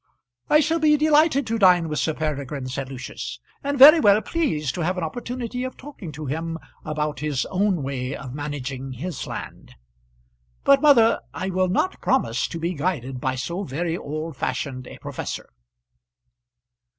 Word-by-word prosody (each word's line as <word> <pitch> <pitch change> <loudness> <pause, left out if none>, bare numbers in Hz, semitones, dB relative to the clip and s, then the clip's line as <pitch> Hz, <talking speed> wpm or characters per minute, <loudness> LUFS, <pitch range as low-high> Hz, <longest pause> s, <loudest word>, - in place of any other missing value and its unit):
"I 300 - +6
shall 325 +3 +1
be 305 -1 +4
delighted 300 -1 +4
to 225 0 -1
dine 180 -4 +5
with 150 -1 -2
Sir 160 - 0
Peregrine," 145 -3 -3
said 130 +1 -4
Lucius, 125 -2 -6 0.2
"and 285 0 -1
very 300 +5 +10
well 205 -5 +5
pleased 155 - -1
to 175 - -4
have 180 +3 0
an 180 - -2
opportunity 245 +7 -4
of 255 0 -5
talking 260 - -9
to 150 +2 -7
him 165 +4 -3 0.3
about 150 -1 -2
his 145 -3 -1
own 190 -4 +1
way 135 0 -3
of 130 -2 -8
managing 135 -2 -5
his 165 +8 -5
land; - - -8 0.9
but, 275 0 +5
mother, 240 -7 +6 0.2
I 190 +1 -3
will 185 0 +1
not 285 - 0
promise - - +1
to 170 - -6
be 170 +2 -2
guided 140 -6 -2
by 130 0 0
so 170 +9 -3
very 165 +1 -2
old 155 0 -5
fashioned 130 0 -3
a - - -10
professor." - - -6
165 Hz, 165 wpm, -24 LUFS, 140-230 Hz, 0.9 s, very